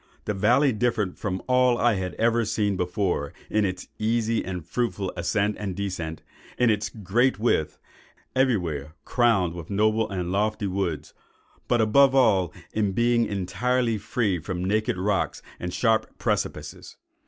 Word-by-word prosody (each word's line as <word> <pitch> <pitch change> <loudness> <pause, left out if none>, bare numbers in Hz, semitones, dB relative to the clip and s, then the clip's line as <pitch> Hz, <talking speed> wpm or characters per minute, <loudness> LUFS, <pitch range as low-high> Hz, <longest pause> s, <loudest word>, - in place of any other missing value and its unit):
The 105 - -1
valley 125 +8 +3
differed 110 -4 -1
from 95 -3 -3
all 125 -1 +3
I 120 -1 +3
had 95 -2 -3
ever 115 +1 +2
seen 105 -2 0
before, 90 -5 -1 0.2
in 105 -1 +2
its 95 -1 -4
easy 115 +1 +1
and 90 -3 -5
fruitful 105 -3 -2
ascent 100 +4 0
and 100 -3 -4
descent,—in 95 +5 -3
its 105 0 -1
great 115 +5 +1
width, 105 -9 0 0.6
everywhere 85 - 0
crowned 110 -9 +2
with 85 -2 -8
noble 110 +2 +2
and 90 -2 -3
lofty 105 +2 0
woods,—but 95 +5 -3
above 135 +5 +5
all, 100 - +4 0.2
in 105 -3 0
being 120 +1 +2
entirely 110 +5 0
free 105 -3 -1
from 90 +2 -4
naked 105 0 0
rocks 95 0 -1 0.2
and 90 - -4
sharp 110 +2 +1
precipices." - - -3
105 Hz, 140 wpm, -25 LUFS, 95-115 Hz, 0.6 s, above